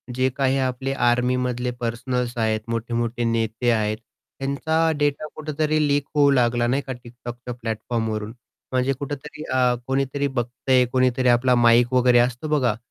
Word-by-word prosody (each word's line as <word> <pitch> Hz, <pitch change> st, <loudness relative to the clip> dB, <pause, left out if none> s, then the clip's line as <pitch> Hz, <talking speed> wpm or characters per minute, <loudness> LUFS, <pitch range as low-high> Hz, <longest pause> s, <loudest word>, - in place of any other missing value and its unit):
जे 130 Hz, +1 st, +2 dB
काही 135 Hz, -1 st, +2 dB
आपले 130 Hz, +1 st, -1 dB
आर्मीमधले 125 Hz, 0 st, +1 dB
पर्सनल्स 120 Hz, +1 st, -2 dB
आहेत, 110 Hz, -1 st, +1 dB
मोठे-मोठे 115 Hz, +1 st, -2 dB
नेते 115 Hz, +1 st, 0 dB
आहेत, 110 Hz, -1 st, 0 dB, 0.4 s
ह्यांचा 160 Hz, +4 st, +1 dB
डेटा 145 Hz, +1 st, 0 dB
कुठेतरी 155 Hz, 0 st, -1 dB
लीक 145 Hz, -1 st, +1 dB
होऊ 145 Hz, -1 st, +5 dB
लागला, 120 Hz, -2 st, +2 dB
नाही 135 Hz, +4 st, +1 dB
का 130 Hz, -, -3 dB
TikTokच्या 120 Hz, 0 st, -9 dB
प्लॅटफॉर्मवरून. 110 Hz, -1 st, -3 dB, 0.4 s
म्हणजे 130 Hz, +1 st, +1 dB
कुठेतरी 145 Hz, +2 st, -6 dB
अ, 125 Hz, -1 st, +3 dB
कोणीतरी 135 Hz, +1 st, 0 dB
बघतंय, 125 Hz, 0 st, +1 dB
कोणीतरी 130 Hz, 0 st, +2 dB
आपला 125 Hz, +1 st, +4 dB
माईक 120 Hz, +1 st, +4 dB
वगैरे 125 Hz, -1 st, +5 dB
असतो 125 Hz, +5 st, 0 dB
बघा, 125 Hz, -6 st, +1 dB
125 Hz, 140 wpm, -23 LUFS, 120-135 Hz, 0.4 s, होऊ